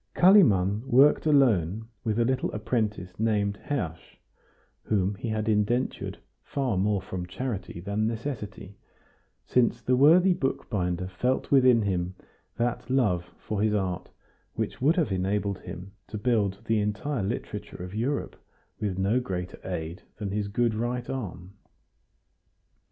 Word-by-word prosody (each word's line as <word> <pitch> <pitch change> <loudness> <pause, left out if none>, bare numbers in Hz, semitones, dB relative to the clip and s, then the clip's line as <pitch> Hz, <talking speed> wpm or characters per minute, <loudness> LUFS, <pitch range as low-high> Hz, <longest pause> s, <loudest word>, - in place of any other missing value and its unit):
Kalimann 110 - +5
worked 140 +5 +5
alone 110 - +3 0.2
with 110 -2 0
a 120 - +3
little 130 +1 0
apprentice 105 -4 -2
named 105 -2 +1
Hersch, 85 - -4 0.6
whom 100 -2 0
he 115 +4 -5
had 110 0 -1
indentured 110 +4 0 0.3
far 135 -6 -1
more 100 0 +1
from 90 -1 -5
charity 105 -4 -4
than 100 +4 -1
necessity, 110 -4 -5 0.7
since 120 -1 +2
the 125 +3 +1
worthy 170 +8 +6
bookbinder 90 - -2
felt 125 +8 -1
within 130 -4 +6
him 90 -2 -1 0.4
that 120 +1 -1
love 105 -10 +2
for 105 -2 -3
his 105 0 +2
art 90 -3 -2 0.5
which - - -3
would 150 +6 +4
have 160 - +1
enabled 100 +1 -1
him 90 +2 -8 0.2
to 105 - -5
bind 105 -4 +1
the 110 -1 +2
entire 105 +6 -1
literature 95 -2 -4
of 90 +1 -8
Europe 125 +7 -2 0.4
with 100 -4 -2
no 100 +6 +2
greater 90 -7 -5
aid 85 0 -5 0.2
than 105 -2 -4
his 105 0 -1
good 115 +3 +1
right 120 +2 -2
arm. 100 -7 -6
105 Hz, 135 wpm, -27 LUFS, 95-125 Hz, 0.7 s, worthy